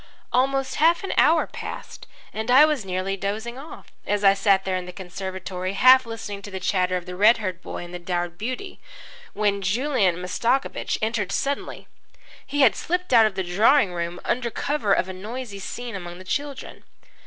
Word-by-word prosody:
Almost 270 +1 +1
half 330 +4 +3
an 390 - -2
hour 325 +2 +4
passed, - - -8 0.3
and 220 +2 -4
I 265 +5 +8
was 300 -7 0
nearly 190 +1 -2
dozing 220 +6 -4
off, 300 +4 -11 0.2
as 205 0 0
I 195 -1 +7
sat 195 -1 +2
there 190 -1 -1
in 180 -1 -4
the - - -6
conservatory 185 0 -5
half 255 +4 +6
listening 210 -3 -6
to 205 - -9
the 190 -1 -5
chatter 185 0 +1
of 175 - -7
the 180 -1 -7
red 215 +5 +5
haired 185 -5 -4
boy - - -6
and 175 - -12
the 180 - -5
dowered 175 -1 -3
beauty, 255 - -5 0.5
when 205 -1 0
Julian 210 - +1
Mastakovich 230 +9 -1
entered 215 -3 -1
suddenly. 280 +6 -3 0.6
He 285 +1 -1
had 260 -5 +6
slipped 360 -3 -2
out 225 -2 +7
of 205 - -6
the 190 - -1
drawing 200 +4 +3
room 170 0 -4
under 240 -1 0
cover 285 -3 -1
of 190 - +3
a 190 - -6
noisy 215 +2 -7
scene 240 +4 -6
among 175 -2 -7
the 185 - -11
children. 285 +7 -5
205 Hz, 190 wpm, -24 LUFS, 185-255 Hz, 0.6 s, I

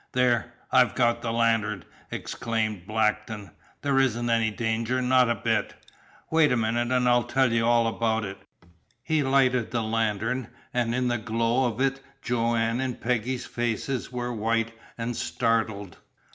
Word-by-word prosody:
"There 120 -2 +2 0.2
I've 125 -4 +4
got 120 -1 +2
the 115 - -2
lantern!" 115 -4 +1 0.3
exclaimed 110 -5 -3
Blackton. 105 -1 -1 0.3
"There 140 -2 +2
isn't 120 -2 +1
any 115 -1 +2
danger, 115 +3 -1
not 125 -1 +4
a 120 - +2
bit. - - -1 0.6
Wait 160 -2 +4
a 125 - +2
minute 115 +1 0
and 125 -1 +2
I'll 120 0 +5
tell 130 0 +2
you 115 0 +2
all 120 -1 +4
about 115 -1 0
it." 95 0 -7 0.6
He 160 -2 +1
lighted 130 -3 +2
the 120 -1 -1
lantern, 115 +2 -1 0.3
and 120 -1 0
in 125 0 +1
the 120 -1 0
glow 115 +3 +1
of 115 0 -4
it 135 0 +1 0.2
Joanne's 115 0 0
and 130 -2 -3
Peggy's 125 +1 -1
faces 120 +2 -2
were 125 -1 -3
white 115 +1 0 0.2
and 115 +1 -3
startled. 110 -7 -1
115 Hz, 155 wpm, -26 LUFS, 115-125 Hz, 0.6 s, I'll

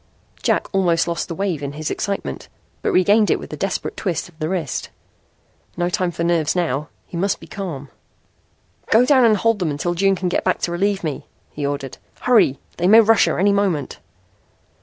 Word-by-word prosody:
Jack - - +1
almost 175 -4 +2
lost 170 0 -2
the 165 - -5
wave 190 -6 -2
in 140 0 -4
his 155 +1 -4
excitement, 200 -1 -4 0.3
but - - 0
regained 205 +4 +4
it - - +3
with - - -9
a - - -2
desperate - - -3
twist 175 -3 -2
of 175 -3 -21
the 155 - -2
wrist. 170 -8 -3 0.9
No 175 0 0
time 180 0 0
for 170 0 -4
nerves 170 -2 +1
now. 155 -4 -1 0.2
He - - -11
must 195 +3 0
be - - -12
calm! 165 -9 -6 1.0
"Go 230 +3 +5
down 260 -1 +5
and 215 -2 +4
hold 230 0 +1
them 175 -4 0
until 150 +4 -2
June 195 +2 +2
can 185 0 -2
get 175 - 0
back 185 - +1
to 170 - -1
relieve 195 +2 0
me," 155 -4 -4 0.2
he 145 -1 -3
ordered. 140 -2 -5 0.2
"Hurry. 220 - +4 0.2
They 175 - +1
may 220 +4 +8
rush 225 -1 +5
her - - -1
any 200 +2 +3
moment." 190 -8 -1
180 Hz, 200 wpm, -20 LUFS, 155-200 Hz, 1.0 s, may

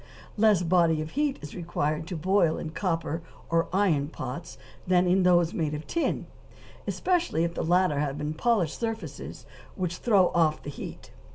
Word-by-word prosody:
Less 210 -4 +4
body 170 -2 +3
of 155 0 -4
heat 290 -1 0
is 150 - -7
required 160 -2 -2
to 180 - -4
boil 175 0 +2
in 160 - -5
copper 165 -2 -2 0.3
or 165 0 +2
iron 180 -8 +2
pots, 170 +2 -7 0.3
than 180 0 +4
in 185 +2 +3
those 175 -2 +4
made 155 -3 -1
of 150 - -6
tin, 335 - -1 0.6
especially 350 - +1
if 170 0 -1
the - - -3
latter 175 -3 +2
have 145 -1 -2 0.2
polished 190 -4 +1
surfaces 225 -1 -5 0.3
which 180 -3 -2
throw 200 -6 +4
off 155 -2 +1
the 145 - -5
heat. 140 - -9
175 Hz, 165 wpm, -27 LUFS, 160-190 Hz, 0.6 s, Less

